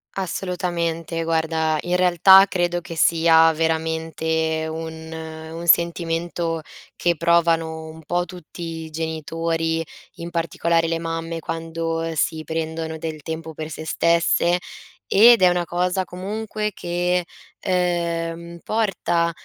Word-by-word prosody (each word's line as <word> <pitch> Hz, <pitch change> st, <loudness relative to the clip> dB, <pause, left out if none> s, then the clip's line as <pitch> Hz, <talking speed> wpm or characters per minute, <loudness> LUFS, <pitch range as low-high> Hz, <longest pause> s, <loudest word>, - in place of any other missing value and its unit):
Assolutamente. 170 Hz, -3 st, -2 dB
Guarda, 160 Hz, -1 st, +1 dB
in 175 Hz, +1 st, 0 dB
realtà 185 Hz, +2 st, +7 dB
credo 175 Hz, -2 st, 0 dB
che 165 Hz, 0 st, -8 dB
sia 165 Hz, 0 st, +5 dB
veramente 160 Hz, 0 st, -1 dB
un 160 Hz, 0 st, -6 dB
un 160 Hz, +1 st, -7 dB
sentimento 170 Hz, 0 st, +1 dB, 0.4 s
che 175 Hz, -1 st, +1 dB
provano 165 Hz, -1 st, +2 dB
un 160 Hz, 0 st, -11 dB
po' 175 Hz, +3 st, 0 dB
tutti 180 Hz, -1 st, -11 dB, 0.2 s
i 160 Hz, -, -9 dB
genitori, 165 Hz, +1 st, -2 dB, 0.3 s
in 170 Hz, +1 st, -7 dB
particolare 170 Hz, 0 st, 0 dB
le 165 Hz, 0 st, -1 dB
mamme, 165 Hz, 0 st, -4 dB
quando 165 Hz, 0 st, -3 dB
si 155 Hz, +1 st, 0 dB
prendono 160 Hz, 0 st, -3 dB
del 155 Hz, -1 st, -5 dB
tempo 160 Hz, +1 st, -6 dB
per 155 Hz, 0 st, -6 dB
se 155 Hz, +1 st, -7 dB
stesse, 170 Hz, +2 st, +2 dB, 0.5 s
ed 230 Hz, +1 st, +7 dB
è 185 Hz, -, +7 dB
una 175 Hz, -1 st, 0 dB
cosa 180 Hz, +2 st, 0 dB
comunque 210 Hz, +4 st, -4 dB
che, 175 Hz, +1 st, 0 dB, 0.4 s
ehm, 170 Hz, -2 st, -1 dB
porta 195 Hz, -6 st, 0 dB
165 Hz, 115 wpm, -22 LUFS, 160-175 Hz, 0.5 s, realtà